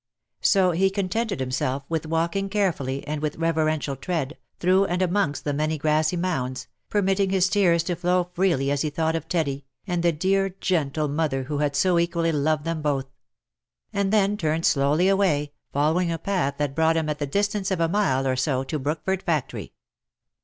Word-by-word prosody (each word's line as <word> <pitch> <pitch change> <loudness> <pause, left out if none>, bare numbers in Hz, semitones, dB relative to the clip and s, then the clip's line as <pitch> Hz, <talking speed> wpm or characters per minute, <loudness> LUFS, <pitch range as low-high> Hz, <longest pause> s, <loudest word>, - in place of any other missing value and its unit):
So 190 -3 +4
he 190 +3 +2
contented 200 +1 -2
himself 130 +1 -1
with 160 -1 -2
walking* 170 +5 -1
carefully, 160 -10 -1
and 150 0 -3
with 150 -1 -2
reverential 155 -3 0
tread, 155 0 -3 0.2
through 185 +2 +3
and 180 -1 -1
amongst 185 -5 0
the 145 - -1
many 155 +2 0
grassy 155 +3 +1
mounds, 135 -8 -2 0.2
permitting 195 -1 +1
his 190 -1 +3
tears 175 -5 +3
to 175 0 -2
flow 180 +1 0
freely 170 -7 +1
as 145 -1 0
he 155 - 0
thought 160 +2 -1
of 165 -1 -4
Teddy, 140 -5 -1 0.2
and 175 -3 -1
the 170 0 +3
dear 190 +4 0
gentle 155 -5 0
mother 145 -2 -1
who 145 +2 -3
had 145 -1 0
so 175 +3 +3
equally 170 -1 +1
loved 150 0 +1
them 165 -1 -2
both; 135 -3 -1 0.8
and 200 -1 0
then 205 -1 +2
turned 160 -2 0
slowly 145 +6 +3
away, 185 -7 +2 0.2
following 160 +5 +1
a 165 - -1
path 170 -5 -1
that 145 -2 -1
brought 160 +2 +2
him 160 -1 0
at 150 -1 -2
the 145 - -2
distance 200 +4 0
of 190 -3 -1
a 165 - +3
mile 165 -8 +1
or 130 -1 +1
so 130 0 0
to 150 +3 -3
Brookford 160 +7 -2
factory. 160 -8 -2
165 Hz, 185 wpm, -24 LUFS, 145-185 Hz, 0.8 s, So